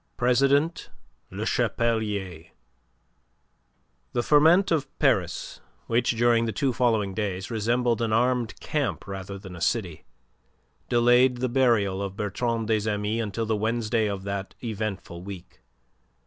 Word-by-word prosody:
PRESIDENT 140 +6 +2 0.4
LE - - -5
CHAPELIER 105 -8 -1 1.7
The 120 - 0
ferment 165 +8 +5
of 150 -4 +1
Paris - - 0 0.2
which, 120 0 +1
during 115 0 +3
the 115 - -1
two 130 +5 0
following 110 -5 +1
days, 95 0 -3
resembled 120 +1 +1
an 115 -1 0
armed 120 +1 +1
camp 145 -4 -2
rather 95 0 -6
than 95 -2 -10
a 85 - -10
city, 90 -7 -1 0.9
delayed 120 +1 +4
the 130 +1 -1
burial 115 -7 +2
of 100 0 -5
Bertrand 115 +3 -1
des 110 -1 +1
Amis 105 +2 -1
until 110 +1 -3
the 110 0 0
Wednesday 110 +1 0
of 100 -1 -4
that 100 -1 -5
eventful 105 -6 -4
week. 95 -1 -10
115 Hz, 130 wpm, -26 LUFS, 100-120 Hz, 1.7 s, ferment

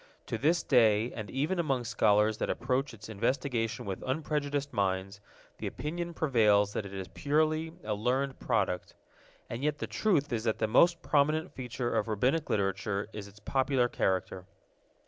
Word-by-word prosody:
To - - -3
this 165 +4 +2
day, 115 -3 +4
and 110 -2 -6
even 155 +8 -1
among 135 -7 0
scholars 110 -2 +2
that - - -1
approach 130 +2 0
its 110 -3 -11
investigation 115 +1 -1
with 95 -2 -4
unprejudiced 145 0 -2
minds, 95 0 -1 0.4
the - - -3
opinion 170 +2 -4
prevails 105 -9 +3
that 105 - -3
it 100 - -11
is 95 -1 -5
purely 155 - 0
a 105 - -1
learned 130 +6 -1
product. 90 -7 -1 0.5
And 120 +4 -5
yet 150 0 +1
the - - -3
truth 155 - +1
is 115 0 -2
that 110 - +1
the 110 - +1
most 165 +10 +4
prominent 155 +4 +2
feature 125 -1 -3
of 105 - +1
Rabbinic 125 +9 +1
Literature 100 +1 -1
is 105 -1 -6
its 100 +1 -16
popular 130 +1 +1
character. 95 -3 -1
120 Hz, 165 wpm, -30 LUFS, 105-145 Hz, 0.5 s, day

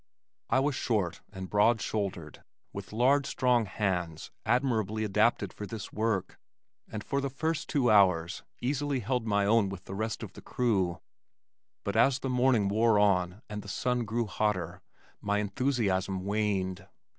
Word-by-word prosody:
I 130 - +3
was 145 +1 +1
short 100 -9 -1
and 95 -2 -6
broad 110 +3 +3
shouldered 95 -9 -4 0.3
with 100 -1 -7
large 135 +5 +3
strong 125 -3 +2
hands 90 -5 -2 0.2
admirably 110 -3 +1
adapted 105 -1 +1
for 105 - -7
this 110 -2 -7
work, 105 -4 -1 0.5
and 105 -1 -5
for 140 - -1
the 140 - -2
first 160 +3 -2
two 125 -5 +2
hours, 90 -4 +4 0.2
easily 140 +1 -1
held 125 +1 -1
my 100 -1 +2
own 105 -1 +3
with 95 -2 -7
the - - -7
rest 110 +3 -3
of 100 - -8
the - - -11
crew, 95 -8 0 0.8
but - - -3
as 135 -2 +4
the 135 - -4
morning 125 -5 +3
wore 110 +2 +3
on 95 0 +2
and 105 -1 -5
the 100 - -12
sun 125 +4 0
grew 115 +2 -1
hotter, 95 -5 -1 0.4
my 100 0 0
enthusiasm 100 -4 0
waned. 100 -2 -1
105 Hz, 155 wpm, -29 LUFS, 95-120 Hz, 0.8 s, hours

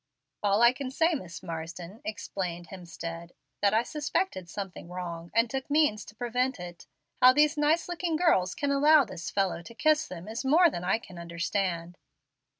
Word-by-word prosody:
"All 205 +2 +3
I 235 +1 +7
can 260 0 -5
say 325 +6 +2
is, 310 - -1
Miss 170 -2 -10
Marsden," 170 +6 -7
explained 180 - -5
Hemstead, 170 -2 -8 0.3
"that 200 +1 +3
I 225 - +3
suspected 295 - -2
something 190 -3 -7
wrong, 170 -2 -6
and 230 +1 +4
took 265 +3 -4
means 290 -9 +2
to 210 - -13
prevent 250 +1 -1
it. 175 -1 -9 0.3
How 255 0 +9
these 300 +2 +4
nice 300 +3 +2
looking 350 -2 -2
girls 310 - +2
can 285 -1 -1
allow 290 +1 +6
this 185 -4 -6
fellow 195 -3 0
to 230 +7 -12
kiss 310 +3 +2
them 180 +1 -9
is 225 +4 -4
more 320 +5 +5
than 175 - -5
I 190 +4 +2
can 185 -6 -12
understand." 170 +1 -3
210 Hz, 180 wpm, -28 LUFS, 175-285 Hz, 0.3 s, How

